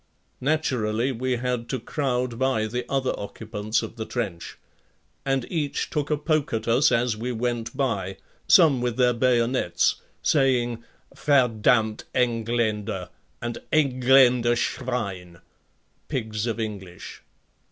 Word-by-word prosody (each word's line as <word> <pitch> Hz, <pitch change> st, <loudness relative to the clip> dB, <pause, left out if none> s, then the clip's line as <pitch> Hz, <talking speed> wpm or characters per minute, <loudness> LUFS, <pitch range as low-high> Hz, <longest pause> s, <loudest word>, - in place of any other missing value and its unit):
Naturally 125 Hz, -5 st, 0 dB
we 130 Hz, +1 st, -1 dB
had 125 Hz, -1 st, -2 dB
to 130 Hz, -, -2 dB
crowd 125 Hz, -2 st, -2 dB
by 130 Hz, -4 st, +1 dB
the 125 Hz, +3 st, -4 dB
other 135 Hz, -1 st, +1 dB
occupants 110 Hz, +1 st, -3 dB
of 110 Hz, -, -8 dB
the 110 Hz, -, -4 dB
trench. 100 Hz, -9 st, -4 dB, 0.7 s
And 135 Hz, -2 st, +1 dB
each 150 Hz, -5 st, -2 dB
took 145 Hz, -1 st, -1 dB
a 150 Hz, -, +1 dB
poke 155 Hz, -1 st, 0 dB
at 110 Hz, 0 st, -2 dB
us 120 Hz, +5 st, +4 dB
as 120 Hz, -1 st, +2 dB
we 120 Hz, +4 st, -3 dB
went 120 Hz, -1 st, -3 dB
by, 100 Hz, -9 st, -1 dB, 0.3 s
some 155 Hz, -, +6 dB
with 120 Hz, -1 st, -1 dB
their 125 Hz, -1 st, +4 dB
bayonets, 120 Hz, -6 st, +2 dB, 0.3 s
saying: 120 Hz, -5 st, +2 dB, 0.3 s
"Verdamnt 115 Hz, -5 st, +2 dB
Engländer" 115 Hz, -3 st, 0 dB, 0.3 s
and: 120 Hz, -1 st, -3 dB
"Engländer 125 Hz, -4 st, +4 dB
Schwein," 100 Hz, -8 st, -3 dB, 0.7 s
pigs 110 Hz, -2 st, -3 dB
of 115 Hz, 0 st, -2 dB
English. 100 Hz, -5 st, -6 dB
120 Hz, 120 wpm, -25 LUFS, 110-130 Hz, 0.7 s, some